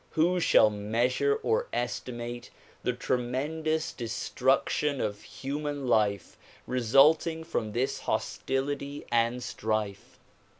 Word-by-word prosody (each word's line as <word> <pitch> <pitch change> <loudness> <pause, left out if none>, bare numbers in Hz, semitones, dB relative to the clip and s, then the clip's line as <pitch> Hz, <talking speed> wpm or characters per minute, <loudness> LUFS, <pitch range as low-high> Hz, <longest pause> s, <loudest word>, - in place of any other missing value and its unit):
Who 175 +3 +3
shall 110 -9 +5
measure 115 - +1
or 470 +2 +1
estimate 120 0 -4 0.3
the - - 0
tremen 130 +6 -2
dous 155 0 0
destruction 130 +4 0
of 105 -2 -2
human 140 +7 -4
life 105 -5 +1 0.3
resulting 140 +7 +4
from 115 -10 -3
this 130 +3 -1
hostility 140 +2 -2
and 120 +1 +1
strife? 110 -4 -3
125 Hz, 100 wpm, -29 LUFS, 115-145 Hz, 0.3 s, shall